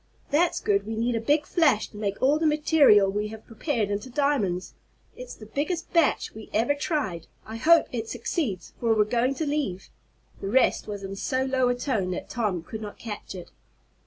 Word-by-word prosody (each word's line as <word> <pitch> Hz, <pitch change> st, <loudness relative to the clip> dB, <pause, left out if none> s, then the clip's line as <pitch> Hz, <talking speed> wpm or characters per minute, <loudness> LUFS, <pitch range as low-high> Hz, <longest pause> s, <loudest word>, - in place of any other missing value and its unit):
"That's 330 Hz, +4 st, +2 dB
good. 200 Hz, -1 st, 0 dB
We 225 Hz, -, -3 dB
need 235 Hz, +2 st, 0 dB
a 225 Hz, -, -1 dB
big 290 Hz, +5 st, +2 dB
flash 295 Hz, -11 st, +2 dB
to -, -, -18 dB
make 200 Hz, -2 st, -3 dB
all 290 Hz, +4 st, +4 dB
the 320 Hz, -, +2 dB
material 295 Hz, -10 st, +5 dB
we 210 Hz, +1 st, -2 dB
have 220 Hz, 0 st, -10 dB
prepared 225 Hz, -2 st, -2 dB
into 205 Hz, +6 st, -3 dB
diamonds. 235 Hz, -10 st, 0 dB, 0.4 s
It's -, -, -9 dB
the 215 Hz, -, -12 dB
biggest 310 Hz, -, -3 dB
batch 335 Hz, -3 st, +2 dB
we 220 Hz, 0 st, -10 dB
ever 230 Hz, +6 st, +3 dB
tried. 285 Hz, -, -2 dB, 0.2 s
I 220 Hz, +1 st, -7 dB
hope 330 Hz, +8 st, +5 dB
it 225 Hz, -2 st, -4 dB
succeeds, 235 Hz, -, -3 dB
for 230 Hz, -2 st, +2 dB
we're 215 Hz, -, +4 dB
going 240 Hz, +5 st, 0 dB
to 315 Hz, -, -2 dB
leave 285 Hz, -11 st, -2 dB, 0.3 s
" -, -, -30 dB
The -, -, -4 dB
rest 260 Hz, +4 st, +2 dB
was 205 Hz, -1 st, -6 dB
in 195 Hz, 0 st, -5 dB
so 260 Hz, +6 st, -1 dB
low 260 Hz, -1 st, +1 dB
a 245 Hz, -, +1 dB
tone 235 Hz, -7 st, -1 dB
that -, -, -6 dB
Tom 205 Hz, -8 st, -1 dB
could 220 Hz, +4 st, -7 dB
not 210 Hz, -1 st, -7 dB
catch 210 Hz, -3 st, -7 dB
it. 180 Hz, -2 st, -9 dB
230 Hz, 205 wpm, -26 LUFS, 205-285 Hz, 0.4 s, material